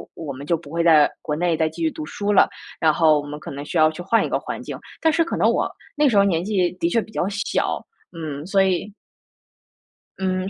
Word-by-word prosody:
我 150 -4 -6
们 135 +2 -9
就 170 - +2
不 155 -3 -14
会 170 +2 -1
在 155 -3 +6
国 150 - -2
内 170 +1 +1
再 160 - +2
继 - - -9
续 320 -1 +1
读 310 0 -6
书 205 -7 -2
了， - - +5 0.3
然 155 -1 +4
后 155 -1 +4
我 - - -10
们 150 +1 -7
可 - - -8
能 140 +1 -6
需 170 - -3
要 155 0 +6
去 160 - -8
换 225 +6 +2
一 - - -4
个 - - 0
环 - - -6
境。 - - -6 0.2
但 320 - +4
是 330 +1 +3
可 - - -3
能 - - +4
我 - - +1 0.3
那 295 0 +3
时 215 - +2
候 200 - +7
年 175 -4 +1
纪 185 -3 +1
的 170 - +1
确 230 +6 +2
比 220 - -12
较 190 - -1
小， 205 +2 -2 0.3
嗯， 155 -4 -6
所 195 +1 +3
以 190 +2 -1 1.3
嗯 185 0 -1
175 Hz, 270 characters per minute, -22 LUFS, 155-205 Hz, 1.3 s, 候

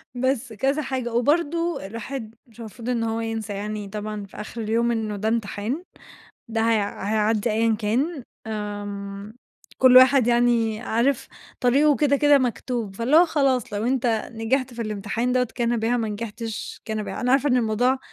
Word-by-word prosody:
بس 260 -2 -1
كذا 270 +8 0
حاجة، 255 -4 -3
وبرضو 330 +5 +1
الواحد 225 +3 -7
مش 230 0 -20
المفروض 230 +2 -7
إن 235 -2 0
هو 225 0 -1
ينسى 225 -2 -4
يعني 210 0 -4
طبعًا 210 0 -5
في - - -15
آخر 220 +2 -6
اليوم 230 +2 +1
إنه 220 -2 -2
ده 215 +2 -2
امتحان، 225 - -2 0.7
ده 225 0 -1
هي 225 0 +3
هيعدّي 215 +2 0
أيًّا 225 +1 +2
كان، 255 +8 -1 0.2
آمم 205 -1 -5 0.4
كُلّ 255 -1 +7
واحد 255 -1 +7
يعني 235 -2 +2
عارف 245 +3 0 0.3
طريقه 280 +3 +4
كده 280 +2 +3
كده 290 0 +5
مكتوب، 240 -4 -2
فاللي 255 +7 +2
هو 345 +1 +7
خلاص 270 -8 +1
لو 205 +2 -2
أنت 255 -1 +1 0.3
نجحت 250 +3 -1
في 230 - -3
الامتحان 215 +3 -2
دوّة 250 -2 +1
كان 240 -1 0
بها، 230 +2 +1
ما 225 -2 -1
نجحتش 220 +1 -6
كان 220 -1 -3
بها. 270 - -5
أنا 250 +1 +1
عارفة 280 +2 +3
إن 255 - +3
الموضوع 245 +3 +2
230 Hz, 170 wpm, -24 LUFS, 215-255 Hz, 0.7 s, كُلّ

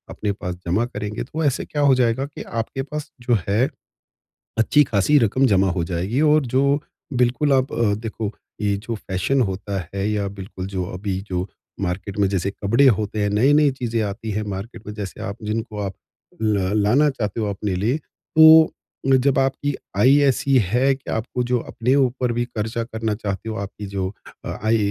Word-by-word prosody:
अपने 105 - -1
पास 90 -1 -3
जमा 100 +7 +2
करेंगे 105 0 -3
तो 155 +5 -4
ऐसे 140 -4 +1
क्या 145 - -3
हो - - +6
जाएगा 120 +3 +1
कि 140 - -9 0.2
आपके 135 +4 -5
पास 150 -1 -4
जो 120 -2 +2
है, 100 +3 +2 1.0
अच्छी-ख़ासी 145 -1 +3
रक़म 130 +6 +2
जमा 95 0 +3
हो 85 - +1
जाएगी। 95 - 0
और 155 -2 +3
जो 130 +1 +4 0.6
बिल्कुल, 135 +4 +2
आप 130 0 +1
अ, 110 -3 +2
देखो 110 -1 -4 0.3
ये 100 -1 +1
जो 115 +3 -5
फ़ैशन 105 +7 0
होता 100 +1 -4
है 100 +1 -1
या 105 -1 -1
बिल्कुल, 95 -1 -6
जो 95 -2 -3 0.2
अभी 95 -1 -2
जो 90 0 -2 0.3
मार्केट 95 +2 -3
में 100 - +4
जैसे 95 -1 0
कपड़े 110 +7 +2
होते 110 0 -3
हैं, 100 - +1
नई-नई 140 +8 +4
चीज़ें 115 -2 0
आती 110 +2 -6
हैं 105 +1 -1
मार्केट 105 +3 -8
में 105 - -5
जैसे 100 -3 -6
आप 100 +3 -5
जिनको 110 0 -3
आप 100 -1 -3 0.5
ल 100 -3 +1
लाना 135 +9 +4
चाहते 115 -6 -3
हो - - 0
अपने 100 -1 -2
लिए, 110 +10 +1
तो 160 +1 +5 0.5
जब 140 - +3
आपकी 135 +2 0 0.3
आय 135 +3 +6
ऐसी 135 +1 +2
है 125 +8 +2
कि 135 - -12
आपको 120 +2 -2
जो 125 0 +1
अपने 125 +4 +1
ऊपर 130 -2 +1
भी 120 +1 0
ख़र्चा 115 0 -3
करना 110 -2 -3
चाहते 100 +2 -3
हो, 110 - -3
आपकी 100 +1 -6
जो 95 0 -3 0.3
आय 110 +1 0
110 Hz, 185 wpm, -22 LUFS, 100-130 Hz, 1.0 s, हो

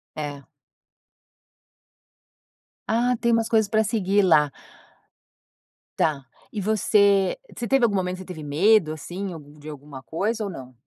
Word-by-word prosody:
É. 145 -2 -6 2.4
Ah 240 +2 +2
tem 235 0 +2
umas 230 0 +1
coisas 220 -2 +2
para 220 +1 +2
seguir 205 -2 +1
lá. 150 -5 +4 1.5
Tá 145 -4 0 0.3
e 210 - -3
você 200 - +3 0.2
você 235 - -4
teve 270 -2 +2
algum 210 -4 +3
momento 185 -1 -1
você 185 - -9
teve 175 -4 -8
medo 160 +3 +3
assim, 180 +5 -6
algu 150 -2 -13
de 150 - -12
alguma 145 -2 -10
coisa 215 +9 -2
ou - - -4
não? 130 -8 -9
190 Hz, 140 wpm, -24 LUFS, 150-220 Hz, 2.4 s, lá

